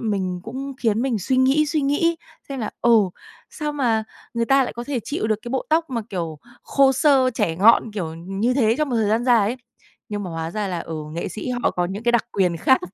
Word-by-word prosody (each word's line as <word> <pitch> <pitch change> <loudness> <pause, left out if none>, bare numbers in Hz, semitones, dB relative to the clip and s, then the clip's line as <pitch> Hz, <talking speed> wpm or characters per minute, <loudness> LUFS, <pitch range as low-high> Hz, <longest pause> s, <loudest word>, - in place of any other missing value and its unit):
mình 190 -5 -2
cũng 270 +4 -6
khiến 225 -1 +1
mình 250 -5 0
suy 255 +8 0
nghĩ 270 +4 +4
suy 300 0 0
nghĩ 310 +4 +1 0.3
xem 270 -3 -5
là, 215 - -3
ừ, 235 - +4 0.6
sao 300 -1 -4
mà 235 -6 +1 0.3
người 235 0 +1
ta 270 0 +5
lại - - -5
có 240 +1 -6
thể 270 -3 -2
chịu 285 -7 -2
được 215 - +1
cái 240 - -7
bộ 265 0 -1
tóc 320 -1 +2
mà, 235 - -1
kiểu, 165 -5 -4 0.2
khô 275 -1 +3
xơ, 265 -1 +4
chẻ 165 -6 0
ngọn 220 +3 +5
kiểu 170 -6 -4
như 195 +9 -1
thế 230 -4 +3
trong 305 -2 +1
một 240 - 0
thời 215 -2 +1
gian 225 +3 +1
dài 245 -2 +5
ấy. 250 - -4 0.5
Nhưng 205 0 -3
mà 180 - -5
hóa 165 0 -4
ra 205 +1 -2
là, 175 -2 -2
ừ, 165 - -6 0.2
nghệ 170 - -3
sĩ 220 - -5
họ - - +3
có 175 - -1
những 195 +5 -5
cái 240 0 +2
đặc 235 - +3
quyền 180 -4 +1
khác. 260 +10 +3
230 Hz, 245 wpm, -22 LUFS, 195-270 Hz, 0.6 s, ta